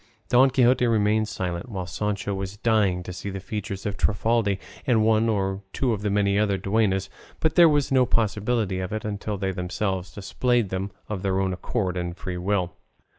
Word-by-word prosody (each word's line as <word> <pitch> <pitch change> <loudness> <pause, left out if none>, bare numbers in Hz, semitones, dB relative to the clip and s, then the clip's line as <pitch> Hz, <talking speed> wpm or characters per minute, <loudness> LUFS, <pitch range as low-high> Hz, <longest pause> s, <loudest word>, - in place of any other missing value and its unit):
Don 130 +2 +6
Quixote 125 -1 +3
remained 110 -1 +2
silent, 90 +2 -4
while 95 -5 -4
Sancho 100 +2 -2
was 95 0 -5
dying 100 -5 +2
to 90 - -7
see 100 - -6
the 95 0 -5
features 100 0 -5
of 100 -1 -2
Trifaldi 105 -1 +1 0.3
and 115 -4 +3
one 110 +1 +3
or 95 -2 -1
two 125 -4 +1
of 105 - -3
her 105 - -1
many 100 0 +2
duennas; 100 -1 +1 0.3
but 160 - +1
there 170 -2 +7
was 145 -3 +1
no 130 -2 +4
possibility 105 -2 0
of 95 0 -4
it 110 0 -3
until 105 0 -3
they 95 0 -1
themselves 95 0 -3
displayed 115 +3 0
them 95 +1 -3 0.2
of 105 -3 -4
their 95 -1 0
own 95 -1 0
accord 95 -1 -2
and 90 0 -4
free 90 -2 -5
will. 90 -1 0
100 Hz, 185 wpm, -25 LUFS, 95-110 Hz, 0.3 s, there